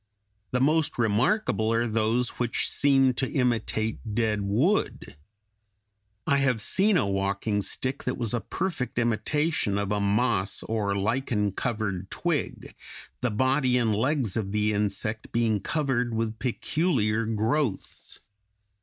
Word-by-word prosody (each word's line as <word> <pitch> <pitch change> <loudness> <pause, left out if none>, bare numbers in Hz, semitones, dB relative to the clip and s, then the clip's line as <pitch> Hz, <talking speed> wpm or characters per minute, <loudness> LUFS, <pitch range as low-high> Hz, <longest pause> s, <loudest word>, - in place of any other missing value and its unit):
The 125 - 0
most 155 +4 +2
remarkable 115 - +1
are 115 +1 +1
those 115 +2 +1
which 120 -1 +1
seem 135 -2 +4
to 130 +2 -2
imitate 110 -4 0 0.2
dead 110 -2 +1
wood. 115 - 0 1.1
I 140 - +3
have 130 -4 +1
seen 195 - +2
a - - +2
walking 100 +1 -1
stick 130 +6 -2
that 125 - -2
was 115 -3 -1
a 120 - 0
perfect 150 -13 -3
imitation 120 0 0
of 100 0 -2
a 105 - +1
moss 100 -1 +1
or 105 -3 -1
lichen 105 0 0
covered 100 -4 -3
twig, 170 -4 -3 0.5
the 125 - 0
body 130 +3 +2
and 115 -4 +1
legs 130 -2 0
of 100 -3 -2
the 105 +1 +1
insect 105 +2 -2
being 115 -3 +1
covered 125 -4 -1
with 115 0 -2
peculiar 120 - 0
growths. 115 +1 -2
115 Hz, 130 wpm, -26 LUFS, 105-130 Hz, 1.1 s, seem